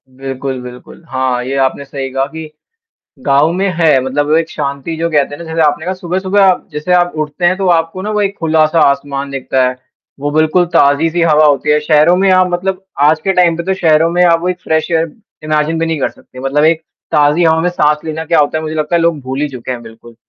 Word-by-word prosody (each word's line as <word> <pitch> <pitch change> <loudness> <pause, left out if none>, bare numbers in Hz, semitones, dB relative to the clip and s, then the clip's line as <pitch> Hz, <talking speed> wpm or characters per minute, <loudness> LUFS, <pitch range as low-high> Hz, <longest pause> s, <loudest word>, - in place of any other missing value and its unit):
बिल्कुल, 135 0 -5
बिल्कुल। 125 +6 -12
हाँ, 130 -1 -1
ये 130 +2 -4
आपने 135 +1 -2
सही 135 -1 -5
कहा 135 +1 0
कि 160 +1 -9 0.8
गाँव 145 +3 +3
में 190 +3 0
है 160 -5 +3
मतलब 145 +3 -1
एक 165 0 0
शांति 140 +4 -4
जो 165 +1 -1
कहते 145 -2 +1
हैं - - -11
ना - - -9
जैसे 165 0 -2
आपने 150 +2 -1
कहा 185 +2 -2
सुबह-सुबह 185 +2 -1
आप 185 -2 +2
जैसे 150 +4 -2
आप 175 0 +3
उठते 155 +3 -3
हैं 180 +1 +2
तो 195 0 -2
आपको 165 +3 -3
ना 210 - -3
वो 210 - 0
एक 200 0 -1
खुला-सा 160 0 +2
आसमान 140 0 -4
दिखता 130 -1 0
है। 125 - -5 0.4
वो 145 +1 -2
बिल्कुल 155 +4 +2
ताज़ी-सी 160 +4 +3
हवा 155 -2 +4
होती 145 0 +1
है 150 - +4
शहरों 155 +3 +3
में 190 +1 +2
आप 185 0 +4
मतलब 190 +2 -2 0.2
आज 155 +2 +4
के 195 - +2
टाइम 175 -3 +3
पे 170 - -3
तो 190 +1 0
शहरों 165 -2 +2
में 175 +1 +1
आप 165 -1 +3
वो 180 - -2
एक 180 -1 -3
फ्रेश 160 -2 -1
एयर 165 -1 +2 0.4
इमेजिन 155 +1 0
भी 165 - 0
नहीं 165 -1 -2
कर - - +1
सकते 130 - -15
मतलब 135 +3 0
एक 160 0 +3 0.3
ताज़ी 150 +3 +3
हवा 160 0 +3
में 175 - +1
साँस 150 -3 +1
लेना 160 0 -4
क्या 165 - +1
होता 150 +1 +1
है - - -5
मुझे 155 0 -5
लगता 155 +2 0
है - - +1
लोग 165 -3 +1
भूल 130 +2 -4
ही 150 - 0
चुके 130 -2 -8
हैं 120 -1 -7
बिल्कुल। 115 +1 -14
155 Hz, 245 wpm, -14 LUFS, 140-170 Hz, 0.8 s, हवा